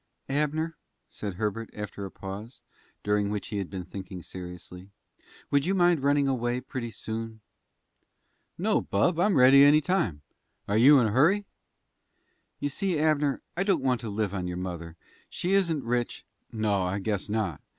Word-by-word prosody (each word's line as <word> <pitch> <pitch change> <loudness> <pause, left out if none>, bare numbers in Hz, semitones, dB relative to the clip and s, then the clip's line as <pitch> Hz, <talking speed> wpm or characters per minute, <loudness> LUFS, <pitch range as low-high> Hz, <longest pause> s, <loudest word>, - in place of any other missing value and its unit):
"Abner," 150 +3 -1 0.3
said 100 -3 -6
Herbert, 110 +3 -3
after 105 -1 -6
a - - -6
pause, 100 +6 -8 0.4
during 105 -1 +1
which 105 -1 -4
he 105 -2 -2
had 95 - -4
been 95 -2 -6
thinking 95 -2 -8
seriously, 90 +1 -9 0.6
"would 140 +2 +2
you 195 - +2
mind 175 -4 +3
running 140 0 +3
away 120 -2 0
pretty 125 -2 -5
soon?" 110 0 -6 1.2
"No, - - +2
bub; 160 - +1
I'm 200 +2 +3
ready 135 +2 +8
any 145 +2 +7
time. 140 - -1 0.4
Are 100 - 0
you 135 +6 +7
in 120 - +3
a 110 - 0
hurry?" 175 - +3 1.1
"You 145 - -1
see, 185 +4 -1
Abner, 150 -2 +1
I 175 - -1
don't 190 -8 +1
want 125 -4 +1
to 115 - -5
live 100 -1 -2
on 90 -2 -3
your 90 0 -4
mother. 85 -2 -6 0.3
She 180 +2 -2
isn't 170 -7 +2
rich 120 0 -2
" - - -47
"No, 105 -3 0
I 90 +2 -1
guess 100 0 -2
not. 105 -8 -2
115 Hz, 170 wpm, -27 LUFS, 100-145 Hz, 1.2 s, ready